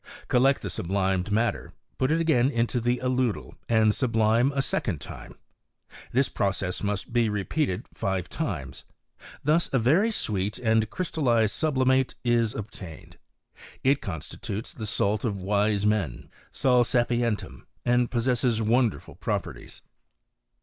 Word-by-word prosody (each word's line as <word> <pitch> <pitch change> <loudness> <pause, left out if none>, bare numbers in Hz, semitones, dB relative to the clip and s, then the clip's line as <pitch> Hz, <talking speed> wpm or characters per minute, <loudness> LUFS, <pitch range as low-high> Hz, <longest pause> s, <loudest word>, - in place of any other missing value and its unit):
Collect 135 +2 +3
the - - -3
sublimed 95 +1 -1
matter, 115 +3 0 0.3
put 130 - +2
it 160 +2 +2
again 145 -6 +3
into 120 -1 0
the 120 +1 +1
aludel, 125 -3 -1 0.2
and 110 -2 +4
sublime 115 +1 +2
a 135 - +2
second 95 - -1
time; 70 - -10 0.8
this 130 +2 +3
pro 100 - 0
cess 95 -2 -3
must 105 +2 -3
be 120 -2 +3
repeated 105 - -1
five 95 -3 -2
times. - - -4 0.6
Thus 155 +4 +2
a 135 - +2
very 155 - +3
sweet 105 - -1
and 110 -2 +2
crystallized 125 - +1
sublimate 130 -4 +1
is 120 -2 +2
obtained: 100 -6 -9 0.6
it 135 +1 +3
constitutes 100 - -6
the 110 -3 -5
salt 100 +1 0
of 105 -5 -1
wise 100 +1 +1
men 100 - -1 0.2
{sal 125 -2 +3
sapientum), 120 -2 -1 0.2
and 120 0 +3
possesses^ 120 -1 +1
wonderful 115 0 +1
properties. - - -5
115 Hz, 130 wpm, -26 LUFS, 105-130 Hz, 0.8 s, and